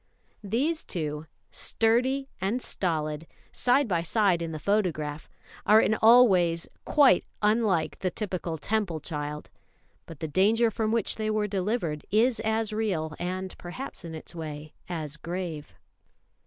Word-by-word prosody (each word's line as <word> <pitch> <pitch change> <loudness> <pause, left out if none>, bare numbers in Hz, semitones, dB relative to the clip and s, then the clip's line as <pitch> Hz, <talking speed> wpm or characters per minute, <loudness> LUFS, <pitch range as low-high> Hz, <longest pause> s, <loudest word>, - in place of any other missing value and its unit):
These 275 - 0
two, 155 -2 -4 0.2
Sturdy 255 +5 +1
and 200 +6 0
Stolid, 155 -7 -2 0.2
side 255 +2 +2
by 175 -5 +1
side 185 0 +2
in 165 -1 -3
the 155 - -4
photograph, 155 -5 -1 0.3
are 215 +1 +6
in 215 - +3
all 235 +3 +7
ways 170 -4 +1 0.2
quite 280 - +5 0.2
unlike 210 -7 +2
the 185 - 0
typical 180 -5 -4
Temple 195 -1 -1
child; 150 -1 -5 0.6
but 165 -4 -10
the 160 - -3
danger 220 +8 +3
from 220 -1 -1
which 230 -3 0
they 215 -1 -1
were 215 -1 +1
delivered 190 -6 -2
is 225 +3 +3
as 220 0 0
real, 185 -8 -1
and 185 +1 -4
perhaps 180 +8 -7
in 165 -1 -7
its 160 - -9
way 155 -2 -7 0.2
as 155 -4 -4
grave. 165 -2 -5
185 Hz, 140 wpm, -27 LUFS, 160-220 Hz, 0.6 s, all